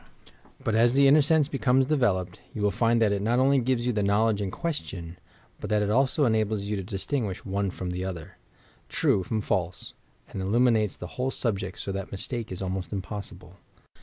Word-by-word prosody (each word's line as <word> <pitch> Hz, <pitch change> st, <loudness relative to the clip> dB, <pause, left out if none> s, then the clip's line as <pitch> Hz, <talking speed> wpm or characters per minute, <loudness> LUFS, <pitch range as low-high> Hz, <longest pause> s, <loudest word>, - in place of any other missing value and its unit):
But 110 Hz, -, 0 dB
as 120 Hz, +3 st, +4 dB
the 140 Hz, 0 st, +6 dB
inner 150 Hz, +3 st, +7 dB
sense 150 Hz, 0 st, +3 dB
becomes 135 Hz, -2 st, +2 dB
developed, 100 Hz, -, 0 dB, 0.2 s
you 105 Hz, -, -2 dB
will 105 Hz, -, +3 dB
find 115 Hz, +3 st, +2 dB
that 110 Hz, -2 st, +3 dB
it 100 Hz, -1 st, 0 dB
not 115 Hz, +4 st, +1 dB
only 135 Hz, +1 st, +4 dB
gives 120 Hz, -1 st, 0 dB
you 125 Hz, -, +1 dB
the 105 Hz, -, 0 dB
knowledge 105 Hz, +1 st, +2 dB
in 100 Hz, -, -2 dB
question, 90 Hz, -, -5 dB, 0.4 s
but -, -, -6 dB
that 105 Hz, -1 st, +2 dB
it 105 Hz, -, 0 dB
also 135 Hz, +4 st, +3 dB
enables 110 Hz, -3 st, +1 dB
you 105 Hz, +1 st, -2 dB
to 100 Hz, -, -3 dB
distinguish 100 Hz, +2 st, -3 dB
one 100 Hz, 0 st, -1 dB
from 90 Hz, 0 st, -5 dB
the 90 Hz, +1 st, -3 dB
other 90 Hz, -4 st, -6 dB, 0.3 s
— -, -, -32 dB
true 95 Hz, -, +3 dB
from 110 Hz, +4 st, -2 dB
false, 90 Hz, -3 st, -2 dB, 0.4 s
and 95 Hz, -, -5 dB
illuminates 110 Hz, +1 st, +2 dB
the -, -, -7 dB, 0.2 s
whole 130 Hz, -, +1 dB
subject 100 Hz, -6 st, -2 dB
so 100 Hz, -, -4 dB
that 95 Hz, 0 st, -5 dB
mistake 115 Hz, +3 st, -5 dB
is 95 Hz, +1 st, -4 dB
almost 95 Hz, -2 st, -3 dB
impossible. 95 Hz, -2 st, -7 dB
105 Hz, 200 wpm, -27 LUFS, 95-125 Hz, 0.4 s, inner